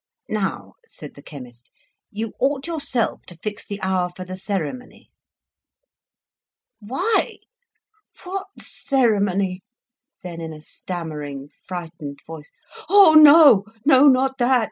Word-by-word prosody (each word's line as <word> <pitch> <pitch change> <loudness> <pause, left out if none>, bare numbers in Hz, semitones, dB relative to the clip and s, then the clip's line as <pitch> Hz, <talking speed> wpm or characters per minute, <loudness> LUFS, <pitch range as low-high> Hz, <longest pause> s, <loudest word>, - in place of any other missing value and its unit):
"Now," 205 -3 -3
said - - -11
the - - -14
chemist, 125 -5 -12 0.4
"you 220 +1 -5
ought 275 +1 0
yourself 295 -8 -2
to 175 - -9
fix 205 +4 -6
the 200 0 -6
hour 185 -1 0
for 185 +1 -10
the 185 +1 -7
ceremony." 195 - -6 1.7
"Why? 270 - -1 0.9
What 385 +2 -5
ceremony?" 200 -8 0 0.6
Then, 170 -2 -7
in 160 -1 -6
a 155 0 -13
stammering, 150 -6 -7 0.2
frightened 165 -5 -7
voice, 155 -2 -10 0.4
"Oh, 395 -5 +7
no! 300 -8 +8 0.2
not 265 -1 +4
that. 250 +1 +3
200 Hz, 110 wpm, -21 LUFS, 170-265 Hz, 1.7 s, no